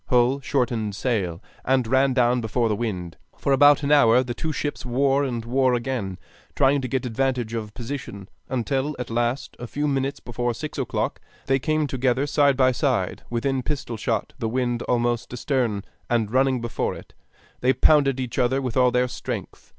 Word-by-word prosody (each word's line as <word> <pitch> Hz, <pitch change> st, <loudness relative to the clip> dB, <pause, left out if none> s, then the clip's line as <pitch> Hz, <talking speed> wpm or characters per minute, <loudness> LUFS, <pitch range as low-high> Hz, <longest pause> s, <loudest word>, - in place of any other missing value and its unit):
Hull 125 Hz, +2 st, +3 dB
shortened 120 Hz, -7 st, -1 dB
sail, 100 Hz, -7 st, -1 dB, 0.2 s
and 130 Hz, -1 st, +2 dB
ran 130 Hz, +3 st, +3 dB
down 125 Hz, -1 st, +3 dB
before 115 Hz, +1 st, 0 dB
the 105 Hz, -, +1 dB
wind. 90 Hz, -7 st, -4 dB, 0.2 s
For 140 Hz, -, +1 dB
about 145 Hz, +2 st, +6 dB
an 140 Hz, -, 0 dB
hour 125 Hz, -4 st, +6 dB
the 120 Hz, -1 st, -4 dB
two 155 Hz, +6 st, -3 dB
ships 145 Hz, -1 st, -3 dB
wore 135 Hz, +3 st, +2 dB
and 120 Hz, -4 st, -3 dB
wore 130 Hz, +1 st, +2 dB
again, 120 Hz, -7 st, -3 dB, 0.4 s
trying 140 Hz, 0 st, +3 dB
to 130 Hz, -, -3 dB
get 130 Hz, +1 st, -2 dB
advantage 125 Hz, -1 st, -1 dB
of 105 Hz, -2 st, -5 dB
position; 115 Hz, -6 st, -6 dB, 0.2 s
until 135 Hz, +3 st, -1 dB
at 125 Hz, -2 st, -5 dB
last, 120 Hz, +3 st, -1 dB
a 120 Hz, -, -6 dB
few 145 Hz, +5 st, -2 dB
minutes 140 Hz, 0 st, -1 dB
before 120 Hz, 0 st, -3 dB
six -, -, -6 dB
o'clock, -, -, -2 dB, 0.2 s
they 135 Hz, 0 st, +2 dB
came 155 Hz, +3 st, 0 dB
together 130 Hz, 0 st, 0 dB
side 145 Hz, -2 st, +3 dB
by 130 Hz, -1 st, +4 dB
side, 120 Hz, -, 0 dB
within 130 Hz, +3 st, -1 dB
pistol 130 Hz, -3 st, -3 dB
shot, 110 Hz, 0 st, -2 dB
the 115 Hz, -, -1 dB
wind 120 Hz, 0 st, -1 dB
almost 120 Hz, -1 st, 0 dB
astern, 120 Hz, -5 st, -1 dB, 0.3 s
and 115 Hz, -3 st, +1 dB
running 130 Hz, 0 st, +2 dB
before 120 Hz, -1 st, -2 dB
it, -, -, -13 dB, 0.5 s
they 125 Hz, -, +3 dB
pounded 135 Hz, -2 st, +4 dB
each 125 Hz, -2 st, -3 dB
other 130 Hz, +2 st, +2 dB
with 125 Hz, -4 st, -3 dB
all 125 Hz, -1 st, +5 dB
their 125 Hz, +1 st, +2 dB
strength. -, -, -6 dB
125 Hz, 180 wpm, -24 LUFS, 120-135 Hz, 0.5 s, about